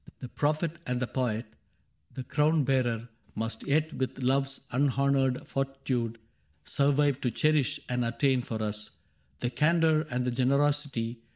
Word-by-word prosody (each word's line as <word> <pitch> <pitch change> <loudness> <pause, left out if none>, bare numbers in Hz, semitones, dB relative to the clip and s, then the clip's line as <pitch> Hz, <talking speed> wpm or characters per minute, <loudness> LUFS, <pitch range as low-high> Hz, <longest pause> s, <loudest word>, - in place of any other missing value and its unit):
The 125 - -8
prophet 155 +5 -1
and 125 0 0
the 130 - 0
poet, 120 -3 -1 0.7
the 130 - -4
crown 150 +3 +2
bearer, 120 -3 0 0.3
Must 115 0 -4
yet 155 +2 +1
with 130 -1 -3
Love's 135 +1 0
unhonored 135 -1 +1
fortitude. 135 -4 -2 0.5
Survive 140 0 +2
to 125 - +1
cherish 150 +2 +2
and 125 0 0
attain 125 +2 +1
for 110 -2 -4
us 105 0 -2 0.5
The 120 - -1
candor 160 +2 +3
and 125 -1 -1
the 125 - 0
generosity. 135 -2 +1
130 Hz, 135 wpm, -29 LUFS, 120-145 Hz, 0.7 s, candor